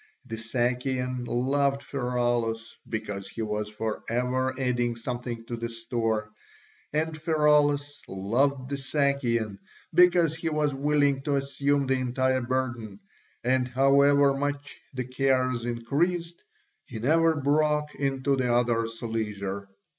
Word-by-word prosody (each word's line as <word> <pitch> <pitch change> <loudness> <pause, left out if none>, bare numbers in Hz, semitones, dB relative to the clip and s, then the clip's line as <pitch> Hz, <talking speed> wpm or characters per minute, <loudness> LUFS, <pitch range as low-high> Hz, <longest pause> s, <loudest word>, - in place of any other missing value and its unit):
The 115 -3 -5
Sakian 125 +2 -1
loved 140 +2 +1
Pheraulas 120 -4 -1
because 105 -3 -4
he 110 +3 -5
was 105 0 -2
for 110 0 -3
ever 130 +2 0
adding 120 -2 0
something 120 0 -5
to 120 - -4
the 115 0 -4
store, 115 -2 -2 0.6
and 155 +1 -1
Pheraulas 150 -2 +2
loved 130 +8 0
the 140 - -1
Sakian 130 -7 0 0.3
because 175 -2 +5
he 165 0 -3
was 150 -2 +1
willing 140 0 +2
to 145 0 0
assume 140 +1 +1
the 130 0 +1
entire 130 +1 +1
burden, 120 -5 -2 0.4
and 125 +1 +2
however 140 +2 +4
much 145 +1 -3
the 130 -1 -3
cares 130 -2 +1
increased 165 +9 -1 0.4
he - - -8
never 160 +7 +3
broke 150 +1 +1
into 135 0 0
the 125 -2 0
other's 115 -1 0
leisure. 100 -3 -3
130 Hz, 125 wpm, -27 LUFS, 115-140 Hz, 0.6 s, because